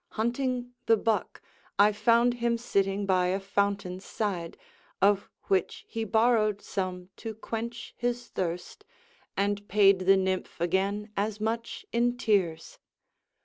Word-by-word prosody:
Hunting 245 +2 -1
the 225 - +6
buck, 220 +1 -1 0.3
I 205 +1 +6
found 230 +3 +3
him 235 -1 0
sitting 200 -3 0
by 185 -2 +3
a 190 +2 0
fountain's 195 -1 -1
side, 185 -7 -3 0.4
Of 200 0 +3
which 190 -2 0
he 225 0 -3
borrowed 220 -1 +3
some 185 -2 -4
to 225 -2 -6
quench 230 +2 -5
his 245 0 -2
thirst, 175 -1 -4 0.5
And 205 +1 0
paid 195 -1 +5
the 195 0 +7
nymph 190 -2 -2
again 195 +5 0
as 210 +1 -1
much 230 +2 -3
in 240 +1 +1
tears. 205 - 0
205 Hz, 130 wpm, -28 LUFS, 195-230 Hz, 0.5 s, the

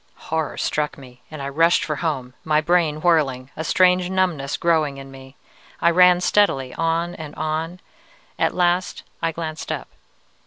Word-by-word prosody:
"Horror 160 -2 -3
struck 150 -1 -1
me, 125 -2 -14
and 155 -3 -7
I 140 - -3
rushed 165 +4 +3
for 150 -2 -3
home, 135 -7 -3
my 155 -1 +2
brain 155 -2 +1
whirling, 140 -7 +1
a 160 - -4
strange 180 +1 +3
numbness 180 -7 0
growing 155 -4 +1
in 135 0 -10
me. 135 0 -13 0.4
I 170 - +4
ran 180 0 +5
steadily, 135 -11 +2
on 165 +1 -1
and 155 -3 -9
on. 160 +3 -3 0.6
At - - +1
last 180 0 0 0.2
I 165 -1 0
glanced 160 -1 -5
up. - - -5
160 Hz, 160 wpm, -22 LUFS, 140-175 Hz, 0.6 s, ran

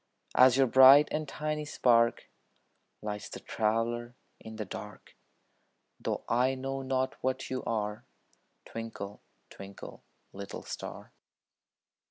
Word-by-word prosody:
As 130 0 +6
your 135 - +5
bright 130 +4 +8
and 155 0 -2
tiny 150 +1 -3
spark 115 -5 +2 0.8
Lights 105 -1 -5
the - - -8
traveler 115 +2 -1 0.2
in 110 0 -10
the 110 -1 -4
dark, 105 +1 -10 0.8
Though - - -3
I 125 +3 +2
know 135 +1 -4
not 130 0 -1
what 130 0 -2
you 130 - -2
are, 105 -2 -2 0.6
Twinkle, 110 -3 -7 0.3
twinkle, 100 0 -11 0.3
little 100 0 -7
star. - - -8
120 Hz, 115 wpm, -30 LUFS, 110-130 Hz, 0.8 s, bright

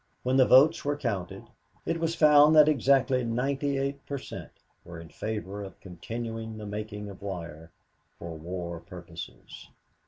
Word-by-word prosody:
When 130 +1 +1
the 130 - +6
votes 145 +6 +6
were 145 0 -1
counted, 105 -10 -3 0.4
it 165 0 -1
was 165 0 -1
found 150 -1 +6
that 150 -1 +8
exactly 135 -2 +3
ninety 135 +4 -1
eight 140 +1 -3
per 140 - -3
cent, - - -8 0.3
were 85 -1 -10
in 80 -1 -11
favor 105 -1 -5
of 95 -2 -11
continuing 110 +4 -6
the 105 - -7
making 105 0 -5
of 100 -1 -10
wire 85 -5 -7 0.5
for 85 -1 -7
war 85 +1 -5
purposes. 85 -1 -10
110 Hz, 155 wpm, -28 LUFS, 90-140 Hz, 0.5 s, that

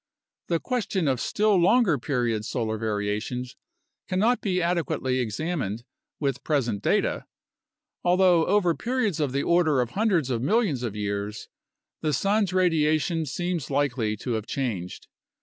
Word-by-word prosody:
The 170 -1 +1
question 210 - -1
of 130 -2 +1
still 210 0 +2
longer 185 - +4
period 120 -4 -1
solar 110 -2 -2
variations 110 +4 -3 0.5
cannot 215 +7 +2
be 185 -3 0
adequately 170 -7 0
examined 120 - -2 0.4
with 140 -2 -2
present 120 -9 0
data, - - +1 0.8
although 180 -2 +4
over 185 -3 +3
periods 240 - -1
of 145 -4 0
the 140 +2 -1
order 165 -5 +3
of 125 -1 0
hundreds 190 - +1
of 115 -2 -1
millions 195 - +1
of 115 -4 -3
years 100 0 -4 0.5
the 155 -1 0
sun's 200 +3 +1
radiation 165 -2 +1
seems 175 +1 -3
likely 130 -6 0
to 125 - -4
have 110 -1 -2
changed. 105 -10 -4
150 Hz, 135 wpm, -26 LUFS, 120-180 Hz, 0.8 s, longer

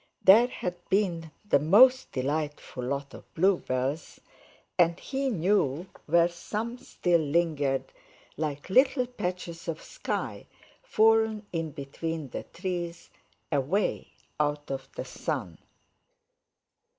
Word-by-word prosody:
There 220 +6 +8
had 180 -7 -4
been 175 -5 +1 0.2
the 140 - +4
most 245 - +6
delightful 145 -1 -3
lot 140 +2 -3
of - - -13
bluebells, 155 -5 0 0.6
and 170 0 +3
he 270 0 -2
knew 180 - +1 0.2
where 170 +2 +5
some 215 +7 -5
still 175 -7 +1
lingered 145 -3 +1 0.5
like 150 +2 -4
little 260 +3 +4
patches 180 -8 -5
of 165 -1 -3
sky - - -4 0.3
fallen 220 - +3
in 165 -1 -1
between 150 +1 -5
the - - -5
trees, 175 -2 -5 0.4
away 145 +8 0 0.3
out 145 -1 -1
of 135 0 -5
the - - -4
sun. 85 -3 -4
170 Hz, 110 wpm, -28 LUFS, 145-205 Hz, 0.6 s, There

